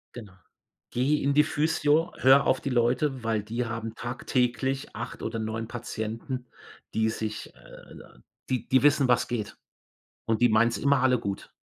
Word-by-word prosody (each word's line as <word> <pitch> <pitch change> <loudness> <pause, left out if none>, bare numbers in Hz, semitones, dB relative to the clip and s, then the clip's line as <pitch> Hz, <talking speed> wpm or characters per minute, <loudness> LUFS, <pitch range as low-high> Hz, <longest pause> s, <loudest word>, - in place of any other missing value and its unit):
Genau. 110 -6 -10 0.6
Geh 130 +5 +2
in 140 - +2
die 150 +1 +5
Physio, 155 +2 +1
hör 135 +2 +6
auf 130 - +2
die - - -3
Leute, 125 +2 +1
weil 110 -2 0
die 115 +3 -3
haben 115 -1 -5
tagtäglich 130 +2 -1
8 115 - -6
oder 115 0 -3
9 110 +1 -3
Patienten, 120 +2 -5 0.5
die 110 0 +1
sich 110 -1 -5
äh, - - -15 0.5
die 130 -2 -2
die 130 +1 +3
wissen, 145 -2 +4
was 125 - +2
geht. 110 -4 -4 0.7
Und 115 0 0
die 120 - +5
meinen's 115 +2 +3
immer 140 -2 +2
alle 125 -2 +4
gut. 100 -3 -5
120 Hz, 160 wpm, -27 LUFS, 115-135 Hz, 0.7 s, hör